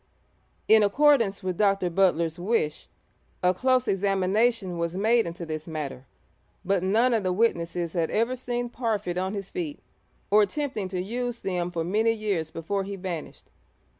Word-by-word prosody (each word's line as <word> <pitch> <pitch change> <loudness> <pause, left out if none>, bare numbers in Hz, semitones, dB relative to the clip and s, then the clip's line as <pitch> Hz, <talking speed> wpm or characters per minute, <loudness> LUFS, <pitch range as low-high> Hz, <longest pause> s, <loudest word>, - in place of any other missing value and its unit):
In 220 0 +7
accordance 225 -2 +3
with 185 -2 -3
Dr. 195 -3 +2
Butler's 170 -2 +2
wish, 180 -5 -1 0.6
a 180 0 +4
close 255 +4 +2
examination 195 0 +1
was 170 +1 -2
made 225 +1 +3
into 170 +1 -6
this 155 0 -5
matter, 145 -5 -5 0.6
but 195 0 +1
none 225 +7 +3
of 225 - +2
the 185 -1 0
witnesses 175 -5 0
had 165 -3 0
ever 230 +4 +1
seen 245 -1 -3
Parfitt 215 -7 -2
on 190 +2 -2
his 195 -1 -6
feet 315 -5 -4 0.5
or 210 +1 +7
attempting 215 -1 -1
to 185 -1 -4
use 240 +5 -3
them 180 -2 -2
for 170 -2 -2
many 215 +6 +2
years 200 -8 -2
before 195 +5 -3
he 200 +1 -5
vanished. 180 -4 -7
195 Hz, 160 wpm, -26 LUFS, 175-230 Hz, 0.6 s, In